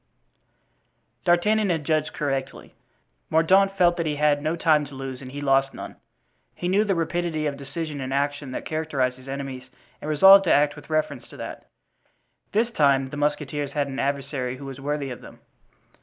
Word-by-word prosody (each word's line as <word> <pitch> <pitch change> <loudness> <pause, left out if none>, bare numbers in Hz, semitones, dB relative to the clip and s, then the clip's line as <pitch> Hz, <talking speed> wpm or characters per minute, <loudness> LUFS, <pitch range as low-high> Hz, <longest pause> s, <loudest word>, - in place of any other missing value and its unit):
D'Artagnan 205 +4 +3
had 165 -3 0
judged 155 +1 0
correctly; 135 -2 -4 0.6
Mordaunt 195 +5 +4
felt 175 -1 +4
that 170 -2 -1
he 150 - -1
had 145 0 +2
no 155 +2 -1
time 155 -3 +3
to 140 - -12
lose, 135 -1 -6
and 130 -1 -9
he 145 +1 -6
lost 135 -1 +2
none. - - -8 0.6
He 175 - -3
knew 195 +4 +3
the 200 -3 0
rapidity 165 -1 -1
of 145 -1 -1
decision 145 +1 -5
and 130 0 -4
action 145 0 -1
that 130 - -5
characterized 145 -5 -1
his 130 +1 -15
enemies 135 -2 -6 0.3
and 150 - -5
resolved 195 +6 +8
to - - +3
act 145 0 +3
with - - -13
reference 155 0 -1
to - - -13
that. - - -8 0.8
This 230 +3 +1
time 140 - +2
the 150 - -6
musketeers 145 -1 -2
had 145 -2 0
an 135 0 -5
adversary 140 -2 -2
who 140 - -9
was 135 -1 -8
worthy 145 -1 -2
of 125 - -8
them. - - -13
145 Hz, 185 wpm, -24 LUFS, 135-165 Hz, 0.8 s, resolved